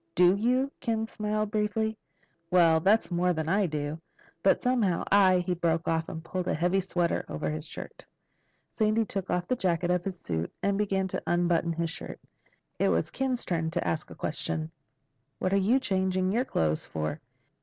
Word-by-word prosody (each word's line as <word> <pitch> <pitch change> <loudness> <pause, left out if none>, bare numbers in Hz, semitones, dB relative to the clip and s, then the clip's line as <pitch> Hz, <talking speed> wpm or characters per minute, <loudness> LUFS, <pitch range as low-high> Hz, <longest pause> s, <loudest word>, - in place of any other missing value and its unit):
"Do 180 +1 +6
you?" 250 +6 +1
Ken 225 -2 -1
smiled 215 -1 -2
briefly. 220 +1 0 0.5
"Well, 165 -3 +5
that's 200 +4 +3
more 180 +1 +2
than 160 -1 -3
I 195 +2 +2
do. 150 0 -3 0.4
But 195 - +4
somehow 230 -9 +1
I—" 190 -2 +5
He 180 - +1
broke 165 -1 0
off 160 0 0
and 160 - -6
pulled 185 +1 -3
a - - +1
heavy 175 +4 +2
sweater 175 -2 0
on - - -4
over 150 - -2
his 155 0 -5
shirt. - - -9 0.7
Sandy 220 0 +2
took 195 -2 -4
off 180 0 0
the 255 - +1
jacket 175 -5 0
of 180 -1 +1
his 185 -2 -5
suit 80 -1 -3
and 200 0 +2
began 195 -2 0
to - - -3
unbutton 175 -1 +2
his 165 0 -2
shirt. - - -7 0.6
It - - +3
was 85 0 0
Ken's 260 -2 -2
turn 165 -2 -1
to - - -2
ask 155 -1 -2
a - - -10
question. 155 +1 -3 0.7
"What're 185 +1 +1
you 215 +7 +3
changing 190 -5 0
your 240 +5 +1
clothes 80 - 0
for?" 75 -1 -4
180 Hz, 185 wpm, -28 LUFS, 165-210 Hz, 0.7 s, Do